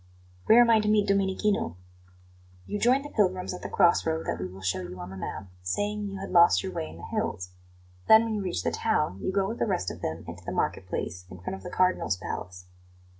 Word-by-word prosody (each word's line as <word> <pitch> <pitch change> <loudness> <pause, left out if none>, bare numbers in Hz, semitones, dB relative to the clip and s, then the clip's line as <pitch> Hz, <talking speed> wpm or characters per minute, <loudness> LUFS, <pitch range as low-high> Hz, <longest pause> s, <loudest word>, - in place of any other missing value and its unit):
"Where 225 - +8
am 235 -1 +5
I 225 - +6
to 210 - -1
meet 210 -1 +3
Domenichino?" 200 - +1 0.9
"You 205 - -3
join 255 +5 +3
the 290 - -9
pilgrims 185 -4 +1
at 180 - -7
the - - -5
cross 175 -3 +4
road 160 0 -1
that - - -2
we 90 - -3
will 95 +1 -11
show 95 0 0
you 90 0 -8
on 90 +1 -7
the - - -8
map, 95 +1 -5 0.2
saying 205 - -2
you 195 0 -6
had 195 +1 -6
lost 170 - +6
your 95 - -4
way 80 -3 -4
in 80 - -11
the 85 - -12
hills. 90 0 -3 0.6
Then, 220 +1 +8
when 225 -1 -2
you 210 - -1
reach 185 -3 -2
the - - 0
town, 150 - 0
you - - -1
go 195 0 +1
with 230 - -5
the - - +1
rest 95 - -1
of - - -10
them 80 +1 -4
into - - -9
the - - -5
marketplace, 90 +1 -3
in 90 - -10
front 90 - -5
of 95 - -11
the - - -7
Cardinal's 180 - +1
palace." 90 0 -6
180 Hz, 240 wpm, -27 LUFS, -, 0.9 s, Where